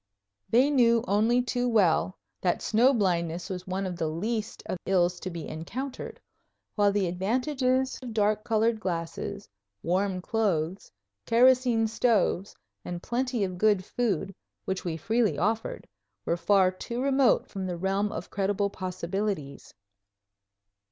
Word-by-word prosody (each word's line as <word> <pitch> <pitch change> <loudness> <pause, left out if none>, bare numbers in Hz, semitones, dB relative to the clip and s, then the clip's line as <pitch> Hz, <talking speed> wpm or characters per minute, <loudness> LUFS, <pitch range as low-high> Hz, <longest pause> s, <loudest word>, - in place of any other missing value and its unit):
They 250 +7 +4
knew 235 -4 +4
only 225 +5 +3
too 245 0 -1
well 185 -4 +2 0.2
that 180 - 0
snow 235 +5 +4
blindness 180 -5 0
was 185 0 -6
one 190 +1 -2
of 180 -2 -4
the 160 - -1
least 215 +7 -3
of 185 - -4
ills 180 -2 +2
to 185 - -5
be 170 -3 -6
encountered; 250 - -6 0.5
while 205 -1 +3
the 200 -1 +1
advantages 255 - 0
of 250 -2 -6
dark 215 -1 +1
colored 225 0 +1
glasses, 180 +2 -4 0.4
warm 185 +2 0
clothes, 185 -4 -1 0.4
kerosene 245 -1 +4
stoves, 220 -4 +1 0.3
and 175 0 -6
plenty 245 -2 -1
of 185 -2 -3
good 205 -3 +3
food, 200 -5 -1 0.3
which 190 -1 -2
we 165 -2 -3
freely 220 +4 +1
offered, 220 +3 -1 0.4
were 170 - +1
far 185 +2 +3
too 235 +6 -6
remote 270 -1 +3
from 190 -2 -5
the 175 -1 -3
realm 195 +3 0
of - - -6
credible 200 0 0
possibilities. 185 -4 -4
205 Hz, 140 wpm, -27 LUFS, 180-235 Hz, 0.5 s, They